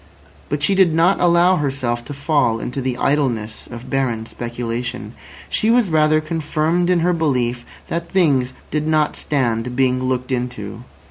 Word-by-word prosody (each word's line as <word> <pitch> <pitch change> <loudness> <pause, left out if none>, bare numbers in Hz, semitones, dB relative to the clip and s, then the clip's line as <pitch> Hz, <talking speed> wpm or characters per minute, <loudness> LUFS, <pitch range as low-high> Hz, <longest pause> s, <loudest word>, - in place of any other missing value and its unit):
But 145 0 -2
she 200 - +3
did 185 -4 +4
not 170 +4 +3
allow 175 +1 +4
herself 130 -5 -2
to 145 - -6
fall 140 -6 +1
into 130 +4 -4
the 125 -1 -2
idleness 120 -7 -1
of 120 0 -9
barren 125 -5 0
speculation. 120 +1 -5 0.3
She 220 - 0
was 230 -6 +3
rather 155 0 +4
confirmed 160 +2 0
in 180 -2 +3
her 180 +2 +2
belief 125 -7 0 0.2
that 170 0 -3
things 140 -9 +2 0.2
did 155 0 -1
not 155 -1 +2
stand 125 -4 -1
being 130 -1 +2
looked 130 0 -2
into. 120 -2 -4
140 Hz, 155 wpm, -20 LUFS, 125-160 Hz, 0.3 s, did